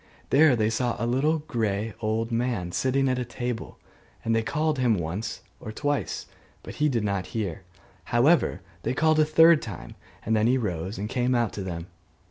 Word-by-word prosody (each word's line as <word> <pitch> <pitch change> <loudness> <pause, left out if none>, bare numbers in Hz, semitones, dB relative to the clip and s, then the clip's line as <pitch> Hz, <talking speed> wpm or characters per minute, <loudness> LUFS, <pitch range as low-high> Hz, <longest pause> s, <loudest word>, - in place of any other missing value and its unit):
There 145 -1 +6
they 110 -1 +1
saw 120 +1 0
a 115 - -2
little 135 +7 +2
grey 110 -5 -1
old 115 +1 -1
man 115 -7 -1
sitting 135 +7 +1
at 130 -1 +1
a - - -1
table; 120 -1 -5 0.5
and 115 0 +2
they 115 - +2
called 150 +6 0
to - - -1
him 120 -3 +3
once 95 +6 -4 0.2
or 110 - -7
twice, 145 +5 -2 0.4
but - - -9
he 150 - +4
did 120 -5 0
not 100 -3 -1
hear: 95 -6 -3 0.4
however, 125 - +3 0.2
they 130 - -2
called 155 +1 +3
a 155 - +5
third 160 +1 +6
time, 100 -7 -8 0.3
and 110 - +2
then 110 +1 +3
he 130 +2 +3
rose 95 -4 -3
and 100 +2 -3
came 125 +2 0
out 120 -2 +1
to 100 - -5
them. 85 -3 -5
115 Hz, 195 wpm, -26 LUFS, 105-130 Hz, 0.5 s, There